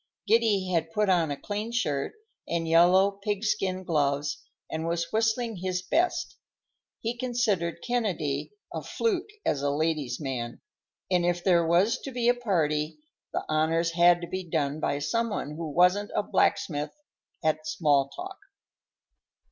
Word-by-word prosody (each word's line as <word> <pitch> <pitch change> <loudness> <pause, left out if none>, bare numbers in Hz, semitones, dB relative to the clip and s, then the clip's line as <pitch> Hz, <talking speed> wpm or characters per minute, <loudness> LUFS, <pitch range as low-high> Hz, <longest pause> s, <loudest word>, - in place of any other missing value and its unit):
Giddy 210 -4 +3
had 165 -1 0
put 210 -1 +2
on 170 -4 +3
a 145 - -3
clean 210 +2 -4
shirt 150 -13 -1 0.3
and 165 -1 -1
yellow 180 +4 +5
pig 205 0 -1
skin 185 -3 0
gloves 145 -3 0 0.3
and 160 +1 -3
was 170 0 -1
whistling 225 0 +1
his 180 0 -2
best. 335 - 0 0.6
He 230 +1 -2
considered 235 -9 -1
Kennedy 190 - -1 0.2
a - - -3
fluke 420 -3 -1 0.2
as 140 - +1
a 145 - +1
ladies' 150 -4 -1
man, 125 -5 -4 0.5
and 180 -1 +3
if 175 0 0
there 170 -3 +4
was 180 +7 +3
to - - -7
be 245 -2 -1
a - - +6
party, 160 -10 0 0.3
the - - -3
honors 165 +2 +1
had 175 +1 +5
to 170 - -5
be 185 +1 -4
done 155 -3 -1
by 140 - 0
some 230 +11 0
one 175 -8 -3
who 160 +1 -5
wasn't 180 +6 +3
a - - +2
blacksmith 150 -6 0 0.5
at 155 0 0
small 145 -8 +2
talk. 380 - -8
175 Hz, 155 wpm, -27 LUFS, 155-210 Hz, 0.6 s, a